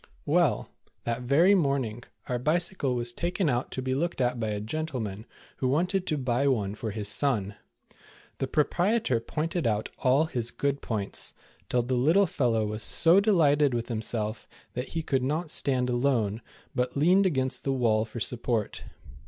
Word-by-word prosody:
Well, -, -, +2 dB, 0.4 s
that 120 Hz, +1 st, -2 dB
very 150 Hz, +10 st, +4 dB
morning, 135 Hz, -, 0 dB, 0.2 s
our 125 Hz, -1 st, -1 dB
Bicycle 155 Hz, -1 st, 0 dB
was 120 Hz, 0 st, -1 dB
taken 175 Hz, 0 st, 0 dB
out 120 Hz, +1 st, -1 dB
to 130 Hz, -, -3 dB
be 130 Hz, 0 st, -1 dB
looked 170 Hz, +4 st, -1 dB
at 125 Hz, -1 st, 0 dB
by 110 Hz, -, -1 dB
a 105 Hz, -1 st, -2 dB
gentleman, 110 Hz, -4 st, -4 dB, 0.3 s
who 130 Hz, -, 0 dB
wanted 180 Hz, +7 st, 0 dB
to 155 Hz, -, 0 dB
buy 130 Hz, +1 st, 0 dB
one 105 Hz, -7 st, +1 dB
for 110 Hz, +1 st, -5 dB
his 105 Hz, 0 st, -4 dB
son. 105 Hz, -3 st, 0 dB, 0.9 s
The 135 Hz, -, -1 dB
proprietor 175 Hz, -, +1 dB
pointed 155 Hz, +6 st, -2 dB
out 105 Hz, -1 st, -1 dB
all 135 Hz, +4 st, +3 dB
his 120 Hz, -7 st, -2 dB
good 140 Hz, +2 st, -2 dB
points, 105 Hz, -4 st, -2 dB, 0.4 s
till 125 Hz, -1 st, +2 dB
the 125 Hz, +2 st, -2 dB
little 160 Hz, +11 st, +4 dB
fellow 120 Hz, -, 0 dB
was 105 Hz, +1 st, -3 dB
so 170 Hz, -, +5 dB
delighted 150 Hz, -, +3 dB
with 120 Hz, +1 st, -3 dB
himself 110 Hz, -1 st, -3 dB, 0.3 s
that 125 Hz, +2 st, -4 dB
he 165 Hz, -, -1 dB
could 135 Hz, -4 st, 0 dB
not 155 Hz, +5 st, -1 dB
stand 130 Hz, -5 st, +1 dB
alone, 120 Hz, -4 st, 0 dB, 0.3 s
but 125 Hz, +2 st, -1 dB
leaned 185 Hz, +6 st, +4 dB
against 130 Hz, -5 st, -1 dB
the 135 Hz, -, 0 dB
wall 115 Hz, -5 st, +2 dB
for 110 Hz, +1 st, -7 dB
sup 120 Hz, +1 st, -1 dB
port. 115 Hz, -4 st, -2 dB
130 Hz, 170 wpm, -27 LUFS, 115-155 Hz, 0.9 s, so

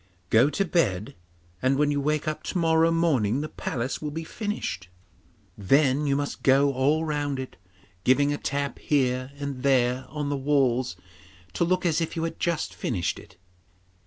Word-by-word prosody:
Go 120 Hz, +6 st, +5 dB
to 195 Hz, +6 st, 0 dB
bed, 110 Hz, -, 0 dB, 0.5 s
and 130 Hz, +1 st, +2 dB
when 145 Hz, 0 st, +2 dB
you 145 Hz, -1 st, 0 dB
wake 150 Hz, +1 st, 0 dB
up 155 Hz, -, -2 dB
to -, -, -2 dB
morrow 165 Hz, -1 st, +3 dB
morning 145 Hz, -8 st, +1 dB
the 155 Hz, -, -3 dB
palace 125 Hz, +1 st, -3 dB
will 150 Hz, -, -3 dB
be 160 Hz, +2 st, -5 dB
finished. 205 Hz, -, -4 dB, 0.7 s
Then 135 Hz, +7 st, +2 dB
you 140 Hz, -, +2 dB
must 145 Hz, 0 st, -3 dB
go 140 Hz, +1 st, +4 dB
all 145 Hz, +5 st, +2 dB
round 145 Hz, -2 st, -1 dB
it, 130 Hz, -, -6 dB, 0.5 s
giving 140 Hz, +3 st, +3 dB
a 145 Hz, -, -4 dB
tap 140 Hz, 0 st, -2 dB
here 130 Hz, -2 st, 0 dB
and 140 Hz, -2 st, -5 dB
there 130 Hz, -1 st, +2 dB
on 150 Hz, -2 st, -3 dB
the 145 Hz, -, 0 dB
walls 130 Hz, -7 st, +1 dB, 0.6 s
to -, -, 0 dB
look 185 Hz, +2 st, +1 dB
as 165 Hz, -1 st, +2 dB
if 165 Hz, -, -3 dB
you 165 Hz, -, -2 dB
had 165 Hz, -, -4 dB
just 170 Hz, -2 st, -1 dB
finished 90 Hz, -8 st, -2 dB
it. 90 Hz, -, -17 dB
140 Hz, 175 wpm, -26 LUFS, 130-155 Hz, 0.7 s, Go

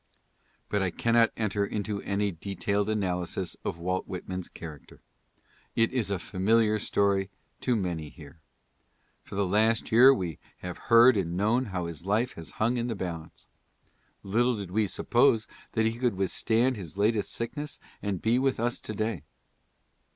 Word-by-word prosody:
But 105 Hz, -, 0 dB
I 95 Hz, -, +1 dB
cannot 115 Hz, +5 st, +3 dB
enter 105 Hz, -2 st, 0 dB
into 105 Hz, 0 st, -2 dB
any 100 Hz, 0 st, 0 dB
detailed 100 Hz, +3 st, -2 dB
analysis 90 Hz, -3 st, -1 dB
of -, -, -3 dB
Walt 90 Hz, +2 st, -2 dB
Whit 90 Hz, -2 st, -6 dB
man's 95 Hz, -1 st, -4 dB
character. 80 Hz, -4 st, -10 dB, 0.8 s
It 115 Hz, +2 st, +2 dB
is 120 Hz, -6 st, 0 dB
a 100 Hz, -, 0 dB
familiar 105 Hz, +4 st, +2 dB
story 100 Hz, -2 st, +1 dB, 0.3 s
to 125 Hz, -, +1 dB
many 85 Hz, -7 st, -2 dB
here. 75 Hz, 0 st, -14 dB, 0.8 s
For -, -, -10 dB
the 100 Hz, 0 st, +1 dB
last 110 Hz, +4 st, +2 dB
year 125 Hz, +4 st, +8 dB
we 90 Hz, -, -2 dB, 0.2 s
have 90 Hz, -1 st, -6 dB
heard 115 Hz, +2 st, +8 dB
and 85 Hz, -2 st, -1 dB
known 115 Hz, +6 st, +2 dB
how 90 Hz, -5 st, -3 dB
his 85 Hz, -1 st, -6 dB
life 110 Hz, +6 st, +1 dB
has 80 Hz, -, -8 dB
hung 120 Hz, +3 st, +1 dB
in 120 Hz, 0 st, -1 dB
the 115 Hz, -, -2 dB
balance. 85 Hz, -4 st, -6 dB, 0.8 s
Little 120 Hz, +4 st, +1 dB
did 100 Hz, -3 st, -6 dB
we 105 Hz, +2 st, +2 dB
suppose 115 Hz, +2 st, +3 dB, 0.3 s
that 110 Hz, -, +2 dB
he 115 Hz, +1 st, -1 dB
could 120 Hz, -5 st, +1 dB
withstand 115 Hz, +6 st, +1 dB
his 95 Hz, -2 st, -8 dB
latest 105 Hz, +1 st, +1 dB
sickness 145 Hz, +5 st, -4 dB, 0.2 s
and 100 Hz, -4 st, -3 dB
be 115 Hz, +3 st, +3 dB
with 135 Hz, -2 st, +1 dB
us 120 Hz, +1 st, -1 dB
to 110 Hz, -, -6 dB
day. 110 Hz, -5 st, -2 dB
105 Hz, 165 wpm, -28 LUFS, 95-115 Hz, 0.8 s, year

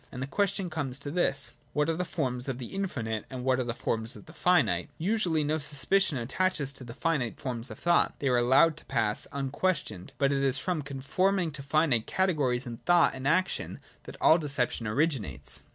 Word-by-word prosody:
And -, -, -7 dB
the 130 Hz, -, -2 dB
question 190 Hz, +4 st, 0 dB
comes 135 Hz, -5 st, -3 dB
to 140 Hz, +1 st, -6 dB
this: 175 Hz, +3 st, 0 dB, 0.2 s
What 150 Hz, 0 st, +1 dB
are 165 Hz, -, +1 dB
the 180 Hz, -, -1 dB
forms 130 Hz, -7 st, -2 dB
of 130 Hz, -, -2 dB
the 125 Hz, -2 st, -8 dB
infinite, 120 Hz, -, -2 dB
and 130 Hz, -2 st, -6 dB
what 130 Hz, 0 st, +2 dB
are -, -, +1 dB
the 120 Hz, -1 st, -3 dB
forms 115 Hz, +2 st, -2 dB
of -, -, -12 dB
the 160 Hz, -, -13 dB
finite? 180 Hz, -4 st, +2 dB
Usually 175 Hz, -4 st, +1 dB
no 155 Hz, +2 st, 0 dB
suspicion 150 Hz, +3 st, +1 dB
attaches 140 Hz, +3 st, -1 dB
to 130 Hz, -, -7 dB
the 120 Hz, -1 st, -9 dB
finite 150 Hz, -9 st, -1 dB
forms 125 Hz, -1 st, -4 dB
of 110 Hz, -, -8 dB
thought; 175 Hz, 0 st, +2 dB
they 140 Hz, -, -2 dB
are 125 Hz, -, +3 dB
allowed 130 Hz, +7 st, +4 dB
to -, -, -13 dB
pass 110 Hz, -5 st, -1 dB
unquestioned. 140 Hz, -, -2 dB
But 140 Hz, 0 st, +2 dB
it 140 Hz, -1 st, +1 dB
is 135 Hz, -1 st, +3 dB
from 180 Hz, -4 st, -1 dB
conforming 160 Hz, +7 st, 0 dB
to 140 Hz, -1 st, -6 dB
finite 140 Hz, -5 st, +1 dB
cate 190 Hz, -2 st, +1 dB
gories 125 Hz, -4 st, 0 dB
in 120 Hz, -2 st, -6 dB
thought 175 Hz, +6 st, +4 dB
and 130 Hz, +1 st, -4 dB
action 185 Hz, +5 st, 0 dB, 0.3 s
that -, -, -9 dB
all 160 Hz, -, +6 dB
deception 135 Hz, -6 st, -1 dB
oricrinates. 105 Hz, -, -1 dB
140 Hz, 205 wpm, -29 LUFS, 125-165 Hz, 0.3 s, all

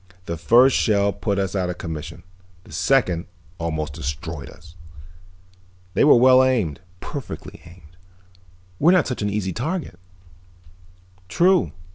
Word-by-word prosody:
The 85 Hz, -, -4 dB
first 120 Hz, +11 st, +4 dB
shell 100 Hz, -2 st, +2 dB
put 100 Hz, -3 st, -2 dB
us 95 Hz, 0 st, -2 dB
out 90 Hz, -2 st, -1 dB
of 90 Hz, -, -5 dB
commission, 80 Hz, 0 st, -7 dB, 0.4 s
the -, -, -17 dB
second 85 Hz, 0 st, +1 dB, 0.3 s
almost 80 Hz, -2 st, -3 dB
destroyed 75 Hz, +3 st, -6 dB
us. 80 Hz, -1 st, -16 dB, 1.2 s
They -, -, +2 dB
were 145 Hz, -, +7 dB
well 130 Hz, +1 st, +6 dB
aimed, 110 Hz, -, 0 dB, 0.2 s
perfectly 140 Hz, -4 st, -8 dB
aimed. 85 Hz, -1 st, -17 dB, 0.8 s
We're 170 Hz, +5 st, +5 dB
not 180 Hz, -5 st, +3 dB
such 125 Hz, -, -4 dB
an 105 Hz, -, 0 dB
easy 100 Hz, -3 st, -2 dB
target." 150 Hz, -, -4 dB, 1.3 s
"True." 180 Hz, -, +3 dB
95 Hz, 130 wpm, -22 LUFS, 85-130 Hz, 1.3 s, were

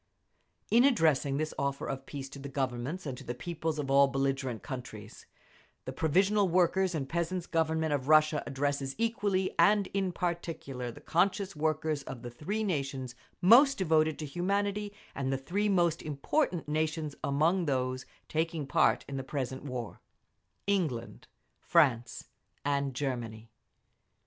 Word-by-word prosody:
In 235 Hz, +3 st, +6 dB
addressing 155 Hz, -, +3 dB
this 155 Hz, +1 st, -2 dB
offer 140 Hz, 0 st, -1 dB
of 135 Hz, 0 st, -5 dB
peace 140 Hz, -2 st, -6 dB
to 140 Hz, -, -10 dB
the 140 Hz, +1 st, -7 dB
Governments 135 Hz, +5 st, -3 dB
and 135 Hz, -3 st, -3 dB
to -, -, -10 dB
the 120 Hz, -1 st, -5 dB
peoples 160 Hz, +3 st, -3 dB
of 140 Hz, -2 st, -2 dB
all 140 Hz, 0 st, +6 dB
the 135 Hz, -, -8 dB
belligerent 135 Hz, -3 st, -1 dB
countries, 115 Hz, -6 st, -8 dB, 0.6 s
the -, -, -5 dB
Provisional 195 Hz, +6 st, +3 dB
Workers' 180 Hz, +1 st, +2 dB
and 140 Hz, -4 st, -2 dB
Peasants' 170 Hz, +3 st, -2 dB
Government 160 Hz, -1 st, 0 dB
of 135 Hz, -2 st, -2 dB
Russia 155 Hz, 0 st, +5 dB
addresses 140 Hz, 0 st, -1 dB
equally 210 Hz, -4 st, 0 dB
and 205 Hz, -1 st, +5 dB
in 195 Hz, -2 st, 0 dB
particular 165 Hz, -8 st, -4 dB
the -, -, -13 dB
conscious 190 Hz, +2 st, +1 dB
workers 155 Hz, -1 st, 0 dB
of 120 Hz, -3 st, -8 dB
the 120 Hz, -, -6 dB
three 200 Hz, -, -3 dB
nations 135 Hz, -, -2 dB, 0.3 s
most 270 Hz, +8 st, +7 dB
devoted 155 Hz, -4 st, +2 dB
to 155 Hz, -, -5 dB
humanity 200 Hz, +6 st, -1 dB, 0.2 s
and 135 Hz, -1 st, -2 dB
the 135 Hz, -, +1 dB
three 195 Hz, +10 st, -1 dB
most 175 Hz, -4 st, +2 dB
important 160 Hz, -, -1 dB
nations 155 Hz, 0 st, -1 dB
among 165 Hz, +6 st, +2 dB
those 130 Hz, -2 st, -1 dB, 0.2 s
taking 160 Hz, -1 st, -1 dB
part 135 Hz, -, +2 dB
in 140 Hz, -, -5 dB
the 135 Hz, -, -3 dB
present 130 Hz, -1 st, -4 dB
war—England, 130 Hz, -, -5 dB, 0.3 s
France, 120 Hz, -1 st, +2 dB, 0.4 s
and 140 Hz, -2 st, 0 dB
Germany. 115 Hz, -5 st, -4 dB
150 Hz, 145 wpm, -30 LUFS, 135-180 Hz, 0.6 s, most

